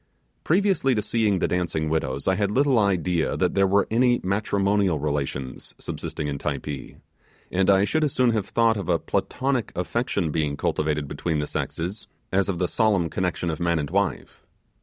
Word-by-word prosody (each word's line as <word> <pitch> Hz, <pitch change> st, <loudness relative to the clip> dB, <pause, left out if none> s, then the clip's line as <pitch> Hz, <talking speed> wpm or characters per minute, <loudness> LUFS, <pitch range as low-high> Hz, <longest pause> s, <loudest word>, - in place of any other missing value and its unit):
Previously 180 Hz, -7 st, +2 dB
to 105 Hz, -, +1 dB
seeing 110 Hz, -2 st, +1 dB
the -, -, +1 dB
Dancing 85 Hz, -3 st, -1 dB
Widows 70 Hz, -4 st, -2 dB
I 95 Hz, -, +4 dB
had 100 Hz, +1 st, 0 dB
little 130 Hz, +2 st, +3 dB
idea 90 Hz, -4 st, +1 dB
that -, -, +1 dB
there 100 Hz, 0 st, +3 dB
were 100 Hz, +1 st, +3 dB
any 120 Hz, +1 st, +3 dB
matrimonial 100 Hz, -2 st, +1 dB
relations 70 Hz, -3 st, -3 dB
subsisting 75 Hz, -, -5 dB
in 70 Hz, -1 st, -3 dB
Typee, 70 Hz, -1 st, -4 dB, 0.6 s
and 95 Hz, +1 st, +2 dB
I 95 Hz, 0 st, +5 dB
should 155 Hz, +7 st, +1 dB
as 150 Hz, -, +1 dB
soon 125 Hz, -2 st, +3 dB
have 110 Hz, -3 st, -1 dB
thought 115 Hz, -1 st, +2 dB
of 100 Hz, -, -5 dB
a 85 Hz, -, +4 dB
Platonic 130 Hz, -, -1 dB
affection 95 Hz, -, -1 dB
being 75 Hz, -2 st, -1 dB
cultivated 75 Hz, -1 st, -1 dB
between 80 Hz, +3 st, -2 dB
the 75 Hz, -, -1 dB
sexes, 90 Hz, +7 st, -4 dB, 0.3 s
as 100 Hz, +1 st, +2 dB
of 95 Hz, -, -1 dB
the 90 Hz, 0 st, 0 dB
solemn 100 Hz, -6 st, +1 dB
connection 90 Hz, -2 st, -1 dB
of 80 Hz, -, -5 dB
man 85 Hz, -1 st, +1 dB
and 75 Hz, -2 st, -3 dB
wife. -, -, -1 dB
95 Hz, 180 wpm, -24 LUFS, 80-110 Hz, 0.6 s, I